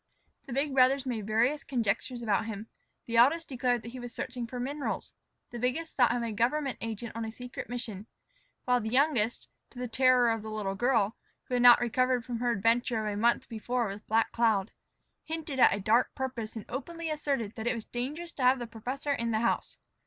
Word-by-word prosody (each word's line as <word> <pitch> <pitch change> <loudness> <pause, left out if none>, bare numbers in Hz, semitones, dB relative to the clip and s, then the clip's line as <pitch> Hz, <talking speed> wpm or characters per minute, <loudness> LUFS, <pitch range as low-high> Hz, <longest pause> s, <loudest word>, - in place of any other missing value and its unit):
The 255 - -5
big 275 +2 0
brothers 265 +1 +4
made 225 -5 -3
various 240 +7 +2
conjectures 240 0 -1
about 215 0 +1
him. 220 0 -6 0.4
The 230 0 -1
eldest 320 +8 +5
declared 245 -3 0
that 230 - -8
he 255 - -8
was 245 -1 -7
searching 245 -1 -5
for 250 +1 -6
minerals; 280 +4 -3 0.4
the 240 - -6
biggest 265 +7 -2
thought 245 -3 +4
him 245 - -1
a 230 - -2
government 255 +6 0
agent 225 0 -5
on 230 - -3
a 220 - -4
secret 245 +2 -8
mission; 225 -4 -5 0.6
while 250 -1 +3
the 220 - -3
youngest, 250 -3 +1 0.2
to - - -17
the 250 0 -3
terror 250 0 +4
of 225 -1 -1
the 220 - -7
little 210 -3 -2
girl, 225 -1 +1 0.3
who - - -8
had 245 - +2
not 245 -1 +9
recovered 250 0 +1
from 240 -2 -4
her 245 0 +1
adventure 230 +1 +1
of 210 - -1
a - - -4
month 235 +3 +2
before 240 +1 -2
with 200 +2 -8
Black 225 +1 +2
Cloud, 220 -4 +2 0.5
hinted 315 -4 -4
at - - +7
a 200 - -1
dark 220 +5 +2
purpose 250 -5 -4
and 220 - -6
openly 330 +5 -5
asserted 275 -8 -2
that 220 +1 -5
it 245 - +1
was 225 - -6
dangerous 295 +8 -4
to 280 - -8
have 255 +1 +5
the 240 - -4
professor 250 +6 -4
in 235 -4 -1
the 220 -1 +1
house. 235 - -1
240 Hz, 210 wpm, -30 LUFS, 225-260 Hz, 0.6 s, not